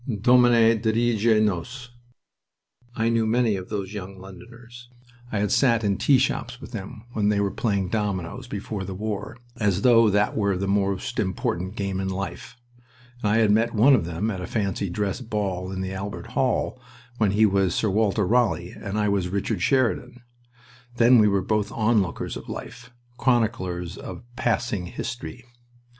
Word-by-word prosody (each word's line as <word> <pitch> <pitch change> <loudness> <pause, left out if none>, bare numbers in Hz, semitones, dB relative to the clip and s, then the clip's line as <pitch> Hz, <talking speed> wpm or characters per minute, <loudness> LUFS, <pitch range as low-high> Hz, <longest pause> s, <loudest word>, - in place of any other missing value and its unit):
"Domine, 120 -1 +5
dirige 115 -1 +2
nos!" 120 +6 -3 1.0
I 115 0 +1
knew 115 -1 +1
many 115 -1 +2
of 95 -1 -7
those 100 -2 -4
young 95 -1 -7
Londoners. 115 +6 -13 0.4
I 110 - -1
had 105 -1 0
sat 115 -4 +3
in 100 -2 +1
tea 140 - +4
shops 125 -1 -1
with 140 - -11
them 110 +1 -7
when 105 -2 +1
they 105 -1 +2
were 100 -1 0
playing 100 -5 -1
dominoes, 105 +2 -3
before 100 -2 -5
the 95 0 -6
war, 105 +2 -4 0.2
as 100 -3 0
though 115 -3 +6
that 105 +1 +1
were 100 -3 +1
the 100 +1 -2
most 100 -1 -1
important 95 -1 -2
game 100 -3 -2
in 95 0 -2
life. 95 +5 -6 0.6
I 105 +1 +2
had 110 -2 +4
met 115 +2 +2
one 125 +7 +6
of 125 - +3
them 85 +6 -2
at 95 -3 -5
a 90 - -5
fancy 100 -2 -2
dress 100 +5 -2
ball 100 -5 -3
in 95 -1 -4
the 95 0 -4
Albert 100 +4 -6
Hall, 130 0 0 0.4
when 105 -3 +2
he 110 +2 +5
was 95 -3 +2
Sir 110 - +1
Walter 105 0 +1
Raleigh 105 -5 +1
and 100 +1 -6
I 105 -1 +1
was 100 -3 0
Richard 100 0 -2
Sheridan. 125 0 0 0.7
Then 120 +1 +6
we 105 - +5
were 100 -2 +1
both 105 -1 0
onlookers 105 -6 0
of - - -9
life - - -8 0.3
chroniclers 95 -8 0
of - - -8
passing 115 -6 -1
history. 120 +4 -6
105 Hz, 170 wpm, -24 LUFS, 95-115 Hz, 1.0 s, though